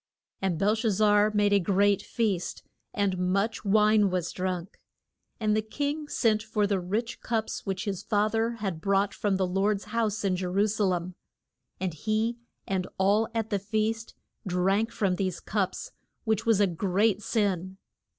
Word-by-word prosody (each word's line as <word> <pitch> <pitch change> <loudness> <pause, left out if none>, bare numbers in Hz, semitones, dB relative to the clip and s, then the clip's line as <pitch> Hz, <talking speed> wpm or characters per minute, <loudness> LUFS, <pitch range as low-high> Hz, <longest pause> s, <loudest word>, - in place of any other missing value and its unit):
And 190 -4 0
Bel 205 +5 +3
shaz 225 -1 0
zar 210 +1 +4
made 205 -1 +2
a 200 - +5
great 200 +1 +2
feast, 205 -7 -2 0.3
and 195 -3 0
much 195 +4 0
wine 210 0 +4
was 180 -2 -2
drunk. 185 -1 -4 0.6
And 215 -1 +2
the 215 - +2
king 290 +7 -3
sent 220 -6 +2
for 215 -1 0
the 200 -1 +1
rich 210 +6 -3
cups 220 -2 -2
which 190 0 -2
his 195 -3 -3
fath 210 0 +1
er 225 +1 +1
had 195 -8 -4
brought 195 +1 +1
from 205 -2 0
the 190 - +1
Lord's 195 +2 0
house 220 -2 0
in 190 -2 +2
Je 180 0 -2
ru 195 +3 +2
sa 215 0 0
lem. 180 -1 -1 0.7
And 185 -2 -2
he 220 +8 -1 0.3
and 190 -1 -1
all 205 +4 +3
at 225 -1 -2
the 200 - +1
feast 220 +3 -2 0.3
drank 195 +5 +1
from 195 -5 0
these 185 -3 -2
cups, 205 - -2 0.3
which 220 -1 0
was 225 -3 +4
a 205 - +5
great 195 +4 +1
sin. 190 -4 -1
205 Hz, 170 wpm, -28 LUFS, 190-220 Hz, 0.7 s, a